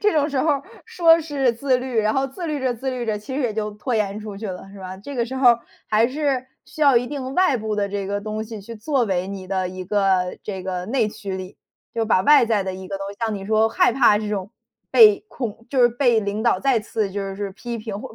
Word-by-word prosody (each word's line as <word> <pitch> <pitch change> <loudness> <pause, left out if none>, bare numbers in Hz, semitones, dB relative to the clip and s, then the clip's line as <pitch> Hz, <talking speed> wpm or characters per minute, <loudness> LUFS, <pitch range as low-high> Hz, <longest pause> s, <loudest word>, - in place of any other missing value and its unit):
这 420 0 +3
种 295 -2 +2
时 285 -3 -2
候 310 - +1
儿 280 -1 0 0.2
说 330 -2 +5
是 280 -5 0
自 255 +2 +1
律， 250 -2 -3
然 215 0 +2
后 270 0 +1
自 335 +6 -7
律 300 -3 -2
着、 255 -2 0
自 260 +3 -3
律 250 -2 -4
着， 215 -1 0
其 210 +6 -7
实 285 - -1
也 240 -5 -1
就 210 -1 -2
拖 220 +4 -3
延 210 -2 0
出 210 -2 -7
去 215 +1 -5
了 185 0 -7
是 200 - -11
吧， 185 0 -7
这 280 +9 -9
个 235 -2 0
时 260 +3 -7
候 245 -3 +6 0.3
还 220 +2 +4
是 270 -1 -1 0.2
需 310 - -5
要 275 -4 +6
一 245 - +2
定 265 -1 -5
外 365 -7 +3
部 220 -2 -3
的 200 -1 0
这 200 -1 -3
个 200 +1 -2
东 215 +1 -4
西 220 -2 -8
去 230 +4 -9
作 255 +3 0
为 185 -3 -1
你 195 -2 -7
的 185 -1 -1
一 185 0 -7
个 190 -2 +1
这 190 -3 -5
个 180 -1 -3
内 230 -2 +1
驱 205 -3 -6
力， 185 +1 -8 0.4
就 230 -1 0
把 210 -4 +3
外 295 +2 +6
在 220 -3 +1
的 190 -1 -4
一 190 0 -8
个 195 -1 -4
东 195 - -5
西， 200 - -11
像 220 -2 -1
你 195 -1 -6
说 220 +1 +3
害 225 - +3
怕 235 -4 +5
这 210 0 -4
种 200 -2 -3 0.4
被 425 -3 +7
恐 230 - -6
就 270 - +1
是 240 - +7
被 240 -2 +2
领 205 +1 -3
导 235 - +2
再 270 -3 +3
次 215 -2 -2
就 195 0 -4
是 200 0 -4
批 235 +4 -6
评 215 -2 -5
或 - - -9
220 Hz, 290 characters per minute, -22 LUFS, 200-260 Hz, 0.4 s, 被